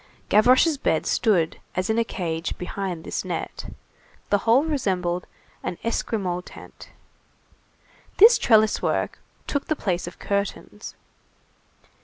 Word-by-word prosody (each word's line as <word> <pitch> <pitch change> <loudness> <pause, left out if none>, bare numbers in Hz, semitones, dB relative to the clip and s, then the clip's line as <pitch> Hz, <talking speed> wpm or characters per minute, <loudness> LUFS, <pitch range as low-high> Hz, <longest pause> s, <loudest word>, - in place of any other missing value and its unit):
Gavroche's 255 +8 +5
bed 160 - 0
stood 180 -9 +1 0.2
as 185 +1 -1
in 225 - +1
a - - +3
cage, 170 -6 -4
behind 180 -2 -4
this - - -3
net. - - -5 0.6
The 205 - +4
whole 235 +6 +4
resembled 185 - -1 0.3
an 175 - -4
Esquimaux 195 -6 -2
tent. - - -13 1.3
This 450 +4 +8
trellis 220 -2 +4
work - - -1 0.3
took 285 - -2
the 310 - +1
place 180 -9 -2
of 175 - -9
curtains. 200 0 -4
200 Hz, 120 wpm, -24 LUFS, 180-230 Hz, 1.3 s, This